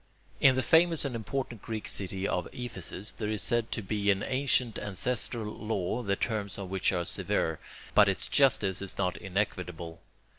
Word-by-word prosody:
In 130 -2 +6
the 130 - +1
famous 165 0 +4
and 130 -3 -2
important 115 0 -4
Greek 110 -2 -4
city 95 0 -1
of 90 - -1
Ephesus 110 -4 -4
there 105 -2 -4
is 110 -1 -1
said 120 -2 +1
to 115 - -2
be 100 +1 0
an 100 0 +3
ancient 130 -3 +1
ancestral 110 +1 -1
law, 110 +1 -2
the 100 -4 0
terms 105 -3 -2
of 95 -2 -6
which 95 -1 +2
are 90 -2 -1
severe, 80 -1 -1 0.3
but - - +7
its - - 0
justice 105 -9 +3
is 100 - -3
not 90 -2 0
inequitable. 90 -4 -3
105 Hz, 175 wpm, -30 LUFS, 95-120 Hz, 0.3 s, but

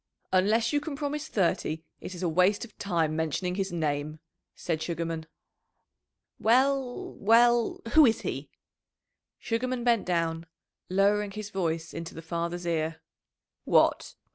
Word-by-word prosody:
"Unless 220 +7 +3
you 290 - +3
can 295 0 -5
promise 295 +1 -3
thirty 165 -4 0 0.2
it 185 - -7
is 180 +1 -3
waste 180 +7 +2
of 220 - -18
time 165 -5 0
mentioning 160 +3 -1
his 195 +1 -2
name," 155 -2 -2 0.4
said 160 -3 -2
Sugarman. 165 -1 -3 1.1
"Well, 260 +2 +2
well 235 +2 +4
who 310 -3 +8
is 225 - +1
he?" - - -4 0.9
Sugarman 245 +2 -2
bent 235 -5 +2
down, 165 -1 -1 0.4
lowering 200 +2 +2
his 205 0 -7
voice 165 -4 -2
into 165 0 -6
the 165 - -8
father's 170 +1 -3
ear. 160 -1 -1 0.6
"What! - - +2
185 Hz, 130 wpm, -28 LUFS, 165-230 Hz, 1.1 s, who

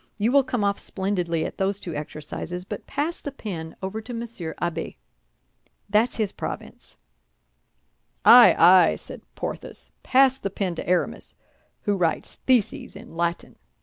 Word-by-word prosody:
You 220 +3 +1
will 280 0 +5
come 245 -4 -2
off 200 0 +1
splendidly 180 -4 -2
at - - -7
those 195 +1 0
two 170 - -6
exercises; 155 +4 -6
but - - -7
pass 300 +5 -2
the 285 - -6
pen 170 -11 -6
over 200 +4 -3
to 240 +2 -7
Monsieur 230 -8 -6
Abbé. 170 -1 -3 1.0
That's 220 +4 +3
his 215 -3 0
province." - - -8 1.3
"Ay, - - +9
ay!" 180 -2 +7
said - - -9
Porthos; - - -5
"pass 265 0 +4
the 195 - -3
pen 190 -2 -2
to 170 - -6
Aramis, 180 - -1 0.5
who 205 - +1
writes 170 -4 0
theses 245 -7 +1
in 205 -3 -12
Latin." 170 0 -2
195 Hz, 150 wpm, -24 LUFS, 170-230 Hz, 1.3 s, Ay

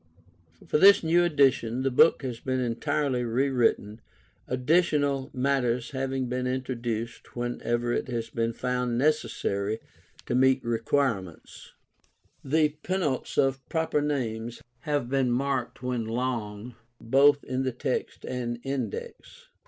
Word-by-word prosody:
For 150 - +1
this 200 +1 +7
new 170 +2 +4
edition 135 -6 +2
the 135 - +1
book 150 +3 +5
has 125 -3 -4
been 130 0 -2
entirely 130 +2 -1
rewritten, 120 -3 +1 0.5
additional 140 0 +1
matter 130 -2 +1
having 135 -1 -2
been 125 +1 -2
introduced 120 -3 -4
whenever 120 0 -1
it - - -1
has 115 -3 -4
been 115 -1 0
found 125 0 -1
necessary 115 -7 0 0.5
to - - -3
meet 130 +1 +3
recent 120 - -1
requirements. 115 - -2 0.7
The 155 +2 +2
penults 180 -8 -2
of 135 0 +2
proper 160 -2 0
names 120 -5 -3 0.2
have 145 -5 0
been 130 -1 +1
marked 130 0 -1
when 125 -3 -2
long, 115 -1 -3 0.3
both 140 +4 +4
in 130 0 -2
the 130 -1 0
text 125 +1 -3
and 120 -2 -3
Index. 135 -6 -6
130 Hz, 125 wpm, -27 LUFS, 120-140 Hz, 0.7 s, this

